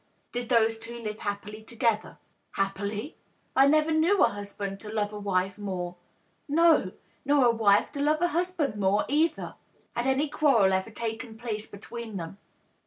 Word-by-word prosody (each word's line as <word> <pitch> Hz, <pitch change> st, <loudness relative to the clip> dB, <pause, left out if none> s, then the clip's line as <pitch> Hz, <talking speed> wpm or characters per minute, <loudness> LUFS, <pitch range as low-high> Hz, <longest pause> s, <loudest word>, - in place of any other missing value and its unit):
" -, -, -44 dB
Did 245 Hz, -1 st, -3 dB
those 225 Hz, -2 st, +3 dB
two 235 Hz, +1 st, -8 dB
live 215 Hz, -2 st, -5 dB
happily 205 Hz, +1 st, -5 dB
together 230 Hz, -1 st, -1 dB
?" -, -, -43 dB
" -, -, -46 dB
Happily! 205 Hz, +6 st, -3 dB, 0.4 s
I 270 Hz, +1 st, +6 dB
never 310 Hz, +2 st, +3 dB
knew 330 Hz, +6 st, +4 dB
a -, -, +5 dB
husband 200 Hz, -1 st, -6 dB
to 210 Hz, -, -9 dB
love 210 Hz, -1 st, -1 dB
a 210 Hz, -, -5 dB
wife 190 Hz, -1 st, 0 dB
mcwre 185 Hz, -4 st, -4 dB, 0.3 s
— -, -, -42 dB
no, 320 Hz, -, +5 dB, 0.3 s
nor 280 Hz, -2 st, +4 dB
a 240 Hz, -, +6 dB
wife 210 Hz, -3 st, +3 dB
to 285 Hz, -, -4 dB
love 305 Hz, +2 st, +2 dB
a 350 Hz, -, +3 dB
husband 340 Hz, -7 st, -1 dB
more, 200 Hz, 0 st, +2 dB
either 315 Hz, +4 st, +1 dB, 0.2 s
!" -, -, -36 dB
1* -, -, -9 dB
Had 240 Hz, +2 st, 0 dB
any 270 Hz, +3 st, +2 dB
quarrel 270 Hz, -10 st, +3 dB
ever 190 Hz, +3 st, 0 dB
taken 225 Hz, +1 st, -5 dB
place 220 Hz, -2 st, -4 dB
between 220 Hz, +1 st, -7 dB
them 170 Hz, +3 st, -7 dB
225 Hz, 190 wpm, -28 LUFS, 205-280 Hz, 0.4 s, I